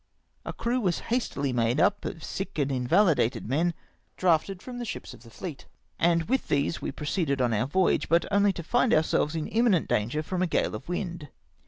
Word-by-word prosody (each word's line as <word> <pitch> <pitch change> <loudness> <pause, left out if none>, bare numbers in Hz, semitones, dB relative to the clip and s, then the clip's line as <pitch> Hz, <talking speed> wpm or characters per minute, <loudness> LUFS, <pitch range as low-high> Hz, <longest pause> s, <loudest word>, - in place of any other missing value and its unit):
A - - -3
crew 240 +2 -1
was 185 -7 0 0.2
hastily 145 - -1
made 120 +3 +1
up 205 +4 +2
of 165 -4 -5
sick 195 - -5
and 140 -2 0
invahded 135 - +2
men 160 +8 0 0.4
drafted 180 +1 +2
from 245 +4 -8
the - - -3
ships 230 - -6
of - - -14
the 115 - -14
fleet, 150 - -8 0.3
and 170 0 +3
with 255 +9 -1
these 145 +3 0
we - - -3
proceeded 150 -2 -1
on 120 -2 +2
our 110 +4 +1
voyage, 185 +6 +1
but 170 +1 +3
only 200 0 +4
to 170 - -6
find 245 +7 +3
ourselves 155 0 +1
in 155 -2 -2
imminent 225 -7 +2
danger 120 +9 0
from 180 +3 -3
a 185 - +2
gale - - 0
of 120 +9 -7
wind. 175 -4 -4
165 Hz, 200 wpm, -27 LUFS, 140-195 Hz, 0.4 s, only